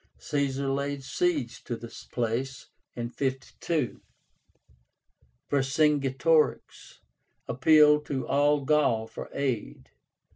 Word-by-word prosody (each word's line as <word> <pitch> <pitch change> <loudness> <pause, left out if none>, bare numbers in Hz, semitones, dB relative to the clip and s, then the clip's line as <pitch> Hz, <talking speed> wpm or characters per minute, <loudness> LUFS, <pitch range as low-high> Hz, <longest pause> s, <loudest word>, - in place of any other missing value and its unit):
Caesar 140 -2 -2
laid 140 0 -2
siege 350 - -1
to 120 - -4
this 115 0 -10
place 125 +3 -3 0.3
(52). 130 +4 -3 1.5
Vercingetorix 145 +2 +1 0.5
appealed 150 +3 +5
to 135 -2 -3
all 145 0 +2
Gaul 135 -7 +2
for - - -9
aid. 130 -6 -3
140 Hz, 80 wpm, -27 LUFS, 130-150 Hz, 1.5 s, appealed